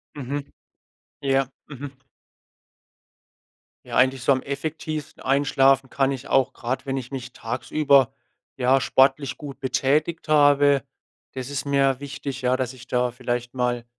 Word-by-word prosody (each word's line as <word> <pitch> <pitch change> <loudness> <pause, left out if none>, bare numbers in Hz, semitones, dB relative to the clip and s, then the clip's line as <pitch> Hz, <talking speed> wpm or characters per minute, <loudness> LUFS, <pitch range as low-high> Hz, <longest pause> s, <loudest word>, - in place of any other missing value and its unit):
Mhm. 140 +1 -4 0.8
Ja. 135 -1 +1 0.2
Mhm. 145 0 -7 2.0
Ja, - - -3
eigentlich 130 0 +3
so 140 - +3
am 130 -1 +2
effektivsten 155 +2 -5
Einschlafen 135 -1 +3
kann 135 0 +1
ich 135 -1 -5
auch 135 -2 +2
grad, 130 +3 -4
wenn 135 0 -1
ich 125 0 -6
mich 130 -2 -6
tagsüber, 135 +2 +2 0.5
ja, 130 +1 +3
sportlich 135 +3 +2
gut 140 -2 -9
betätigt 140 +6 0
habe, 145 -2 +5 0.5
das 130 +1 -6
ist 140 -1 -3
mir 135 -2 +2
wichtig, 140 -1 -6
ja, 125 0 +2
dass 130 -1 -2
ich 130 0 -14
da 125 0 +1
vielleicht 120 0 -3
mal, 120 -1 -1
135 Hz, 135 wpm, -24 LUFS, 130-140 Hz, 2.0 s, habe